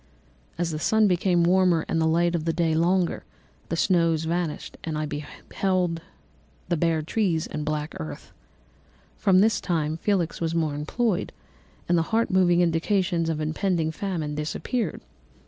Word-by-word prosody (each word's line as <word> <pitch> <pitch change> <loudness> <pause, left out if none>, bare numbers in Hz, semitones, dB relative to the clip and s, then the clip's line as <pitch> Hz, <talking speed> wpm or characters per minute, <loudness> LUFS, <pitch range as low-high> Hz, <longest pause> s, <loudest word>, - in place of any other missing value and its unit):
"As 170 -1 -1
the 155 - -3
sun 220 +5 +3
became 180 -1 +2
warmer 180 -2 +3
and 165 - 0
the 160 - +3
light 170 +2 +2
of 170 -3 -1
day 165 -2 +1
longer, 175 +2 +1 0.5
the - - -1
snow 165 -2 +3
vanished, 165 0 -3
and 160 -2 -3
I 155 - -1
beheld 165 +4 -2 0.7
the 175 - +2
bare 165 -1 +1
trees 170 -2 0
and - - -5
the - - -4
black 150 0 -2
earth. 80 -2 -7 0.9
From 190 -3 +4
this 220 0 +2
time 160 -3 -1
Felix 175 -3 -1
was 165 0 -1
more 160 -3 0
employed, 180 +8 -1 0.6
and 175 -1 +3
the 165 - -2
heart 225 0 +1
moving 180 -2 +4
indications 175 0 +1
of 160 -2 -1
impending 160 +1 0
famine 160 -4 -3
disappeared. 160 - -3
170 Hz, 155 wpm, -25 LUFS, 160-185 Hz, 0.9 s, From